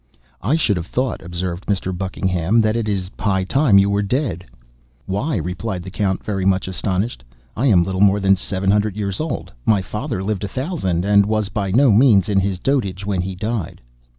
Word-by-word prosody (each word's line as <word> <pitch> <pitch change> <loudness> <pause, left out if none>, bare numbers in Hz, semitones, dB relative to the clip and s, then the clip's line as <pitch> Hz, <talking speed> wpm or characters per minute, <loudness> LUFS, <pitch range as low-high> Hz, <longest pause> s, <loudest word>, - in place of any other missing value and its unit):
"I 130 +9 +1
should 115 - +1
have 85 0 -5
thought," 130 -2 -2
observed 85 +1 -5
Mr. 95 -2 +1
Buckingham, 95 +1 0
"that 110 0 +1
it 115 -2 -1
is 95 -2 -2
high 95 -3 +1
time 135 +1 +3
you 100 0 +5
were 100 0 +1
dead." 100 - -1 0.6
"Why," 110 +11 -1
replied 90 +3 -4
the 95 - -8
Count, 95 -1 -1
very 100 -3 -2
much 95 0 +1
astonished, 95 - -2 0.3
"I 130 +5 +1
am 95 -8 +5
little 95 +1 -2
more 100 0 +5
than 95 0 +4
seven 95 +1 -1
hundred 105 0 +1
years 100 -2 -3
old! 160 - -4
My 105 -4 +2
father 105 0 -4
lived 105 -1 -2
a - - -1
thousand, 100 - -2
and 100 0 +4
was 110 -2 0
by 100 -1 -2
no 125 +6 +4
means 110 -2 +5
in 100 -1 +3
his 95 -1 -1
dotage 100 -5 -1
when 100 -3 0
he 95 +1 -4
died." 105 -1 -4
100 Hz, 200 wpm, -20 LUFS, 95-110 Hz, 0.6 s, you